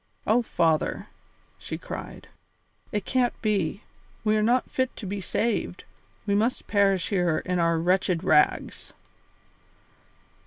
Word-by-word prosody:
Oh, 230 +3 +3
father!" 165 -8 0 0.5
she - - -5
cried, - - -8 0.6
"it 210 -3 -2
can't 250 -2 0
be; 200 -3 0 0.4
we 215 -1 +2
are 215 - +2
not 240 +4 +2
fit 260 -1 -1
to 215 - -8
be 195 +1 -4
saved; 210 -2 -2 0.4
we 200 - 0
must 220 +5 +1
perish 195 -3 +2
here 180 -5 +1
in 180 -1 0
our 165 -1 +2
wretched 180 0 +1
rags." 150 -5 +2
200 Hz, 125 wpm, -26 LUFS, 175-215 Hz, 0.6 s, Oh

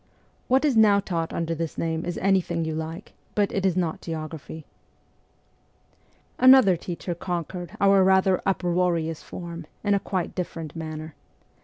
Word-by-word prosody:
What 265 +4 +3
is 285 -5 +2
now 210 -2 +6
taught 170 -4 -3
under 165 0 -2
this 165 -1 -4
name 165 0 -2
is 175 - -3
anything 180 -4 +1
you 160 - -2
like, 160 +4 -6 0.2
but 205 -1 +2
it 195 -1 +1
is 185 -1 0
not 170 -3 -1
geography. 160 -1 -7 1.7
Another 255 -7 +7
teacher 175 +1 -5
conquered 175 0 -5
our 195 0 +5
rather 190 0 +3
uproarious 175 -4 0
form 170 -2 -8 0.2
in 205 -1 +2
a 200 - +3
quite 185 -3 -3
different 165 -4 -5
manner. 155 -1 -6
175 Hz, 145 wpm, -25 LUFS, 165-195 Hz, 1.7 s, Another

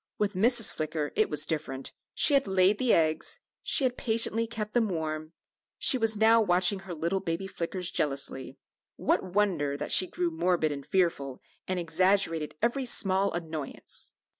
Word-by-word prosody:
With 210 -1 -1
Mrs. 225 +3 +3
Flicker 155 -1 -3
it - - +2
was 150 0 +3
different; 145 -4 -4 0.2
she 295 - +4
had 275 -5 +3
laid 190 +2 +2
the 255 -3 +1
eggs, 160 - +1 0.2
she 280 - +3
had 255 -1 0
patiently 230 0 +1
kept 215 -2 -6
them 230 -3 +1
warm; 155 -2 -4 0.4
she - - +5
was 225 -3 0
now 225 +1 +5
watching 185 0 +2
her 185 -2 -8
little 170 +5 -1
baby 165 +2 -4
Flickers 180 -1 -4
jealously; 135 -2 -2 0.4
what - - 0
wonder 165 -9 0
that 150 - -4
she 185 - +6
grew 175 -1 -2
morbid 170 -1 0
and 140 -1 -7
fearful, 165 -8 -1 0.3
and 185 -1 -2
exaggerated 165 -2 +1
every 250 +2 0
small 195 -3 +2
annoyance! 160 -4 -5
180 Hz, 165 wpm, -28 LUFS, 155-210 Hz, 0.4 s, she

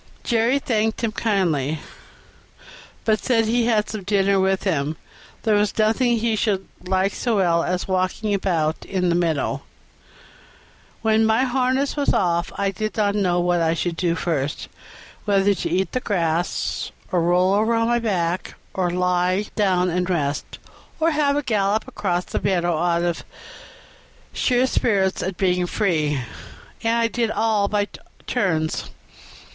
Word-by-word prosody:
Jerry 235 +2 +2
thanked 225 -4 -1
him 225 - +1
kindly, 165 - 0 1.3
but 215 -1 +1
said 240 -3 +3
as 225 - -1
he 235 +1 +2
had 215 -3 +2
some 215 - -5
dinner 195 0 +2
with 190 0 +1
him 155 -5 -1 0.5
there 220 - +2
was 205 0 +1
nothing 230 +3 +2
he 225 0 0
should 205 -3 0 0.2
like 190 +1 +1
so 235 -3 -1
well 170 -4 +2
as 180 0 -2
walking 185 +3 0
about 165 -5 0
in 180 -2 -1
the - - +2
meadow. 165 -4 0 1.4
When 220 0 +3
my 220 +3 +3
harness 260 +2 0
was 285 -1 -1
taken - - +3
off 170 -2 0
I 200 -1 0
did 215 +3 -4
not 205 -2 +2
know 185 -4 +1
what 175 -1 +1
I 165 0 +2
should 170 0 -2
do 170 -1 0
first 150 -4 -2 0.6
whether 200 -1 +3
to 185 - -3
eat 190 -1 0
the 255 - -1
grass, 175 -6 -1 0.2
or 180 -3 +2
roll 180 +3 +3
over 220 +3 +2
on 230 0 +1
my 240 0 +2
back, 185 -5 -1 0.2
or 185 -2 0
lie 180 +2 +1
down 185 -3 +2
and 180 +1 -1
rest, 145 -5 -2 0.4
or 325 +1 +3
have 295 -2 +2
a 290 - -1
gallop 215 -1 0
across 180 -8 -2
the - - -3
meadow 175 -3 +1
out 170 +1 +1
of 175 -1 -1 1.1
sheer 250 0 +2
spirits 200 -7 +1
at 185 -1 -3
being 180 -2 +1
free; 155 -9 0 0.6
and 230 0 +1
I 230 0 +2
did 230 -1 -1
all 220 -2 +1
by 205 0 0 0.4
turns. 160 -5 -1
195 Hz, 160 wpm, -22 LUFS, 175-220 Hz, 1.4 s, said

